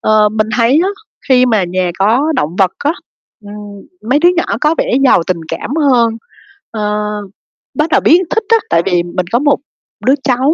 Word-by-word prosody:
Ờ, 215 -1 +3
mình 215 0 -1
thấy 245 +6 +3
á, - - 0 0.4
khi 255 -1 +4
mà 220 -6 +1
nhà 180 0 -2
có 240 +11 +2
động 155 +4 -2
vật 190 -2 +2
á, 295 - 0 0.5
ừm, 205 - -10 0.6
mấy 285 - +4
đứa 345 - +4
nhỏ 345 - +1 0.2
có 305 +1 +2
vẻ - - 0
giàu 180 - +4
tình 180 -2 -2
cảm - - -5
hơn, 245 -7 +2 0.6
ơ, 210 -1 -2 0.7
bắt 305 +1 -1
đầu - - +2
biết 340 +4 +4
thích 445 - -1
á. 455 - +5
Tại 165 - +3
vì 175 -2 +1
mình 175 +1 -4
có 240 - +2
một 290 +1 +2 0.5
đứa 265 - +4
cháu, 265 +3 +1
230 Hz, 195 wpm, -14 LUFS, 195-285 Hz, 0.7 s, á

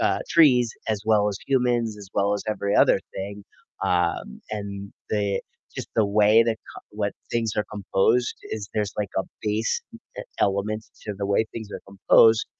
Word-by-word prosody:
uh, - - +2
trees 125 -8 +5 0.2
as 105 -2 -1
well 105 -1 +3
as 100 - -3
humans, 120 -4 +1
as 100 - -11
well 100 0 +2
as 100 - -3
every 100 -1 -1
other - - +5 0.2
thing. 100 +1 -6 0.4
Um, 90 -7 0
and 100 -2 -5 0.2
they 100 -2 0 0.4
just - - -5
the 110 -2 +4
way 105 +2 +5
that 115 -1 0 0.2
ca - - -9
what 105 -1 -2 0.2
things 115 -2 0
are 105 - +1
composed 105 +4 +1
is 105 -2 -5
there's 105 -2 -1
like 100 -2 -1
a 95 - +2 0.2
base 110 +1 0
e - - -10 0.4
element 105 +2 0 0.2
to 105 - -3
the 100 - -2
way 100 +2 +2
things 110 -2 -6
are - - -6
composed. 110 +3 +5
105 Hz, 175 wpm, -24 LUFS, 100-110 Hz, 0.4 s, trees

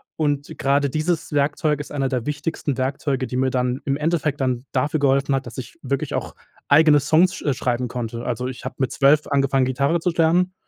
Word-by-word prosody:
und 145 -2 -2
gerade 140 +1 +2
dieses 155 +2 -2
Werkzeug 145 +1 +1
ist - - -10
einer 135 -2 -1
der 125 -3 -2
wichtigsten 150 -1 -3
Werkzeuge, 135 0 -1
die 125 - -5
mir 130 +1 +2
dann 125 0 -1
im 140 -1 0
Endeffekt 150 -2 -1
dann 130 0 -1
dafür 145 +4 0
geholfen 135 0 +2
hat, 135 - -2
dass 120 0 -10
ich 125 -1 -7
wirklich 140 0 -2
auch - - -4 0.3
eigene 150 0 +6
Songs, 160 +6 +3
sch - - -8
äh, 145 - +1
schreiben 125 -1 -1
konnte. 115 -1 -5
Also, 125 +1 -2
ich 130 +1 -7
habe 130 - -5
mit 130 - 0
12 145 +2 +3
angefangen 135 -2 +2
Gitarre 140 +6 +1
zu 180 - 0
lernen, 170 +3 +2
140 Hz, 210 wpm, -22 LUFS, 130-150 Hz, 0.3 s, eigene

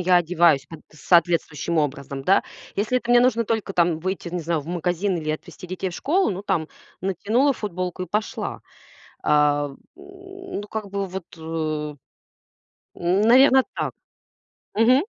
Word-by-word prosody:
я 180 0 +4
одеваюсь 170 -5 +3
как-то 160 -1 -13
соответствующим 170 -1 +2
образом, 140 -2 -2
да. 195 - +4 0.3
Если 220 +5 +1
это 240 -1 -5
мне 245 - +7
нужно 235 -2 +3
только 220 -2 -2
там 170 -3 +2
выйти, 185 +1 -3
не 180 +1 -3
знаю, 165 -1 -1
в 140 - -13
магазин 175 +3 -1
или 155 -2 -2
отвезти 155 +4 -7
детей 185 +1 -3
в - - -9
школу, 365 - +1
ну 190 0 -4
там 160 -6 -1 0.3
натянула 215 - +1
футболку 185 -5 -4
и - - -4
пошла. 210 +5 -3 0.6
Э, 145 -1 +2 0.2
ну, 380 - -9
как 215 -2 -5
бы 200 0 -2
вот, 185 -1 -6
э, - - -14
н 155 -2 -3 1.3
наверно, 260 +3 +6
так. - - -2 0.8
Мгм. 250 +6 +4
180 Hz, 150 wpm, -23 LUFS, 160-220 Hz, 1.3 s, мне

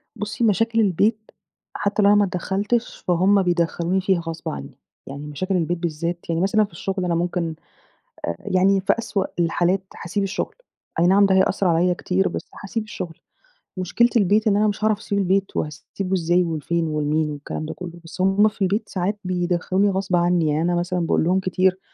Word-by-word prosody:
بُصّي 210 +3 -3
مشاكل 225 +1 +2
البيت، 215 +2 +1 0.4
حتّى 205 +1 0
لو 200 - +5
أنا 205 - +6
ما 205 0 +4
ادخلتش، 200 +6 -1
فهمَّ 185 +3 +4
بيدخلوني 175 +1 0
فيها 190 -1 +2
غصب 165 -1 -5
عنّي، 70 0 -7 0.3
يعني 140 +2 -7
مشاكل 185 +7 -2
البيت 175 +1 0
بالذات، 170 0 -3
يعني 165 0 0
مثلًا 205 +3 +3
في - - -17
الشغل 185 +2 -3
أنا 175 -1 0
ممكن 170 -1 -1 0.8
يعني 190 +1 +2
في 200 +1 +2
أسوأ 200 -4 -1
الحالات 175 +2 +1 0.2
هاسيب 200 +4 -1
الشغل، 195 0 -3 0.5
أي 170 - +4
نعم 200 +2 +5
ده 190 - +3
هي - - +5
هيأثر 190 +1 +1
عليَّ 175 +2 +3
كتير، 185 +2 0
بس - - -6
هاسيب 225 +3 -2
الشغل، 180 -6 -7 0.6
مشكلة 185 +6 +2
البيت 210 +2 +3
إن 200 -1 +4
أنا 215 +1 +3
مش 205 0 -2
هاعرف 215 -1 +2
أسيب 205 -2 -3
البيت، 195 0 0
وهاسيبه 180 +5 -4
إزاي 175 0 +2
وفين 165 0 -1
ولمين؟ 150 0 0
والكلام 145 +1 -5
ده 160 - -5
كلّه، 175 -1 -9
بس 165 +2 -7
هُم 195 +3 +4
في 210 - -7
البيت 205 +3 0
ساعات 195 +3 -2
بيدخلوني 180 +2 +1
غصب 190 -1 0
عنّي، 175 -1 +2
يعني 150 +1 +1
أنا 175 +1 +1
مثلًا 180 +1 -1
باقول 165 -2 +1
لهم 180 +3 +2
كتير، 185 0 +1
185 Hz, 185 wpm, -22 LUFS, 170-200 Hz, 0.8 s, أنا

